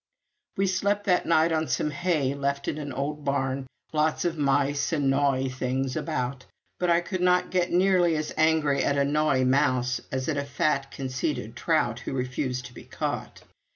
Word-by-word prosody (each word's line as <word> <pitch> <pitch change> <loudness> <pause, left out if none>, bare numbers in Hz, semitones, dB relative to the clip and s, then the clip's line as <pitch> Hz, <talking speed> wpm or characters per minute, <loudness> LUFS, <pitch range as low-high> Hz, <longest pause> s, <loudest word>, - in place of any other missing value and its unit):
We 195 - +2
slept 200 +2 0
that 180 -3 +2
night 165 0 +4
on 160 -1 0
some 150 - 0
hay 155 -4 0
left 140 0 -2
in - - -2
an 145 -1 -5
old 145 +3 -3
barn 135 -1 -1 0.3
lots 155 +2 +1
of 170 -1 0
mice 140 -1 +1
and 140 -4 +2
gnawy 135 -1 +2
things 130 +1 -2
about; 125 +1 -3 0.3
but 180 - +1
I 170 0 +4
could 185 +1 -4
not 180 0 +3
get 180 -1 +1
nearly 180 -2 +3
as 155 0 -3
angry 155 -3 +2
at 140 - +1
a 140 - +3
gnawy 145 -2 +2
mouse 130 -2 +2
as 130 0 -2
at 150 - 0
a 140 - 0
fat 140 0 0
conceited 130 -2 -3
trout - - 0
who - - -5
refused 130 0 -2
to 125 - -11
be - - -12
caught. - - -4
145 Hz, 185 wpm, -26 LUFS, 135-160 Hz, 0.3 s, night